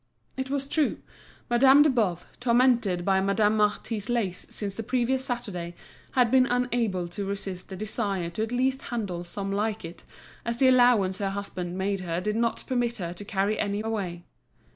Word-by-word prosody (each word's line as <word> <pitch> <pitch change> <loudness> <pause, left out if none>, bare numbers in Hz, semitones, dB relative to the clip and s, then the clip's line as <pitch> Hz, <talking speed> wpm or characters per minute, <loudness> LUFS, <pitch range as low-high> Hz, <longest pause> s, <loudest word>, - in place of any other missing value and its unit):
It 265 0 -4
was 275 0 -2
true, 305 +1 +1 0.5
Madame 265 +4 +6
de 305 - +4
Boves, 205 -9 0
tormented 235 -7 +3
by 190 -1 +3
Madame 205 +2 +2
Marty's 210 +1 0
lace 210 -7 -1
since 200 -2 -3
the 225 - -5
previous 255 +3 0
Saturday, 195 -9 -4 0.4
had 245 -3 +3
been 260 -1 +5
unable 240 -7 0
to 200 +4 -5
resist 195 -2 -5
the 190 - -6
desire 195 -3 -2
to 195 - -4
at 225 +1 -2
least 260 +2 +1
handle 200 -8 -3
some 195 +3 -4
like 210 0 -1
it, 165 +1 -9 0.4
as 235 +1 -2
the 260 +1 +5
allowance 245 -7 +4
her 200 -1 0
husband 185 -3 -4
made 195 +1 -1
her 170 -2 -2
did 210 +3 -2
not 230 0 0
permit 245 -2 0
her 175 -4 -4
to 180 - -8
carry 200 +1 0
any 205 0 -1
away. 195 -6 -3
210 Hz, 180 wpm, -27 LUFS, 190-245 Hz, 0.5 s, Madame